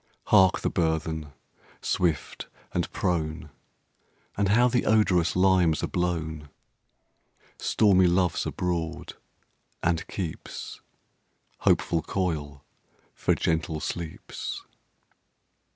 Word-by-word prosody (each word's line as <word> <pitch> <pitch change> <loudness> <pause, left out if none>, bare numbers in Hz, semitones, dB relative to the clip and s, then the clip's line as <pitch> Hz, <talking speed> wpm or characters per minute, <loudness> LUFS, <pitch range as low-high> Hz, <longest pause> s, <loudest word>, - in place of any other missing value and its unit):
Hark! 95 +1 +6
the - - 0
burthen, 80 -3 -1 0.5
swift 85 -6 -1 0.3
and - - -1
prone! 80 -2 -2 0.8
And 100 -1 +1
how 120 +4 +5
the 125 0 +1
odorous 95 -6 +3
limes 90 -3 +3
are - - +1
blown! 80 -4 -2 1.1
Stormy 95 -4 +4
Love's 90 -1 +1
abroad, 85 -3 -3 0.7
and 85 -1 0
keeps 85 -6 -6 0.8
Hopeful 85 -1 +2
coil 75 -6 -3 0.5
for - - +1
gentle 80 -1 -1
sleeps. 80 0 -5
85 Hz, 90 wpm, -27 LUFS, 80-95 Hz, 1.1 s, Hark